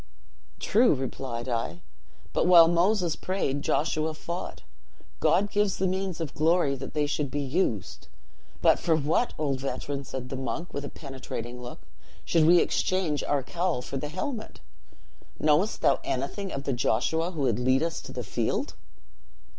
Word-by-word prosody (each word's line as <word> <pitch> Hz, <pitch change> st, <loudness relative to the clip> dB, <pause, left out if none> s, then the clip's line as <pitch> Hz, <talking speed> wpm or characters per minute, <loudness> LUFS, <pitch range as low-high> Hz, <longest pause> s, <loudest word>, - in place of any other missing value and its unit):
'True,' 230 Hz, -3 st, +4 dB
replied 130 Hz, -2 st, -4 dB
I, 115 Hz, -8 st, -2 dB, 0.5 s
'but -, -, +2 dB
while 170 Hz, -2 st, +9 dB
Moses 175 Hz, 0 st, +2 dB
prayed 145 Hz, -7 st, -2 dB
Joshua 155 Hz, +1 st, 0 dB
fought. 170 Hz, +3 st, -6 dB, 0.6 s
God 205 Hz, +1 st, +3 dB
gives 205 Hz, -2 st, +1 dB
the 190 Hz, -, 0 dB
means 185 Hz, -1 st, -1 dB
of 160 Hz, -4 st, -4 dB
glory 160 Hz, -2 st, +3 dB
that 135 Hz, +3 st, -8 dB
they 150 Hz, -1 st, +2 dB
should 145 Hz, -1 st, -1 dB
be 145 Hz, -, -2 dB
used.' 130 Hz, -, -1 dB, 0.6 s
'But -, -, +5 dB
for 165 Hz, -, +2 dB
what, 155 Hz, +10 st, +1 dB
old 140 Hz, -3 st, -1 dB
veteran,' 140 Hz, +1 st, -3 dB
said 130 Hz, -1 st, -6 dB
the 135 Hz, -, -4 dB
monk, 145 Hz, +6 st, -4 dB
with 140 Hz, -, -3 dB
a 140 Hz, -, -5 dB
penetrating 125 Hz, -4 st, -7 dB
look, 120 Hz, 0 st, -8 dB, 0.4 s
'should 165 Hz, -2 st, +3 dB
we 175 Hz, +1 st, +7 dB
exchange 180 Hz, -6 st, 0 dB
our 145 Hz, -2 st, +1 dB
cowl 170 Hz, -3 st, -1 dB
for 135 Hz, -, -4 dB
the 145 Hz, +2 st, -4 dB
helmet? 230 Hz, -, -5 dB, 0.8 s
knowest 155 Hz, +8 st, +2 dB
thou -, -, +4 dB
anything 165 Hz, +10 st, -3 dB
of 140 Hz, -, -4 dB
the 140 Hz, -, -1 dB
Joshua 160 Hz, +8 st, +1 dB
who 165 Hz, -5 st, -5 dB
would 135 Hz, -, +1 dB
lead 130 Hz, +3 st, +3 dB
us 165 Hz, 0 st, -2 dB
to -, -, -10 dB
the -, -, -5 dB
field?' -, -, -1 dB
150 Hz, 160 wpm, -27 LUFS, 135-175 Hz, 0.8 s, while